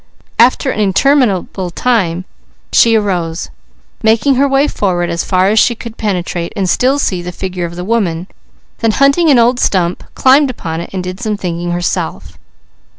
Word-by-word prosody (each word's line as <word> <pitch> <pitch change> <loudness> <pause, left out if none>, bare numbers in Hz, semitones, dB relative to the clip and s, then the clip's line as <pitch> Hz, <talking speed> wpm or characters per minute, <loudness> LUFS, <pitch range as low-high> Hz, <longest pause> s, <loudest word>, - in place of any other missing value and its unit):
After 255 +3 +4
an - - -4
interminable 205 -3 +1
time 185 -4 0 0.5
she 230 -1 +5
arose, 180 -5 -2 0.5
making 225 +5 +3
her 275 +2 +2
way 275 +2 +2
forward 175 -7 -1
as 170 0 -2
far 185 0 +2
as 215 +1 +3
she 235 - +3
could 230 0 -9
penetrate 180 -5 -3
and 195 -3 -1
still 255 +9 +2
see 185 -10 -1
the 180 +1 -6
figure 180 -1 -4
of 170 0 -7
the 180 - -5
woman, 185 -6 -1 0.5
then 225 -2 +1
hunting 280 +6 +3
an 275 - +5
old 240 +1 +3
stump, 180 -5 0
climbed 270 +2 +4
upon 165 -9 -5
it - - -8
and 185 -2 -4
did 185 +1 -6
some 215 -3 -2
thinking 175 -2 -4
herself. 175 0 -3
200 Hz, 170 wpm, -14 LUFS, 175-245 Hz, 0.5 s, she